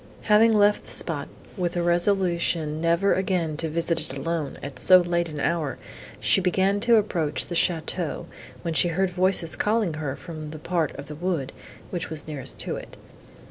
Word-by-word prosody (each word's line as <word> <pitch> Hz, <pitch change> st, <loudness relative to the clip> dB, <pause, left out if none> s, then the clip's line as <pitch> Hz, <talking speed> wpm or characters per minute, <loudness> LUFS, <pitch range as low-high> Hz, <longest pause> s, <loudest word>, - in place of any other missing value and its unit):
Having 220 Hz, +1 st, +5 dB
left 205 Hz, 0 st, +3 dB
the -, -, -15 dB
spot, -, -, +2 dB, 0.3 s
with 180 Hz, -3 st, -2 dB
a 175 Hz, -, 0 dB
resolution 170 Hz, -3 st, +1 dB
never 170 Hz, +4 st, +3 dB
again 180 Hz, -5 st, 0 dB
to 160 Hz, 0 st, -1 dB
visit 165 Hz, +1 st, 0 dB
it 145 Hz, -3 st, -7 dB
alone, 160 Hz, -1 st, -3 dB
at 135 Hz, -2 st, -7 dB
so 185 Hz, -, +8 dB
late 170 Hz, -1 st, 0 dB
an 150 Hz, -2 st, -6 dB
hour, 155 Hz, -5 st, -1 dB, 0.4 s
she 195 Hz, -, +4 dB
began 190 Hz, +2 st, +2 dB
to 235 Hz, +2 st, +4 dB
approach 165 Hz, -10 st, 0 dB
the -, -, -7 dB
château, 165 Hz, -1 st, -1 dB, 0.4 s
when 170 Hz, -2 st, -2 dB
she 175 Hz, -, +4 dB
heard 180 Hz, +2 st, 0 dB
voices 180 Hz, -2 st, +1 dB
calling 210 Hz, -5 st, +1 dB
her 150 Hz, -3 st, -4 dB
from 155 Hz, -3 st, -8 dB
the 155 Hz, -, -8 dB
part 165 Hz, -1 st, -1 dB
of 140 Hz, -, -7 dB
the 150 Hz, -, -8 dB
wood, 160 Hz, -4 st, -2 dB, 0.4 s
which 175 Hz, -1 st, -3 dB
was 155 Hz, -2 st, -5 dB
nearest 135 Hz, -4 st, -5 dB
to -, -, -3 dB
it. -, -, -10 dB
170 Hz, 180 wpm, -25 LUFS, 155-185 Hz, 0.4 s, so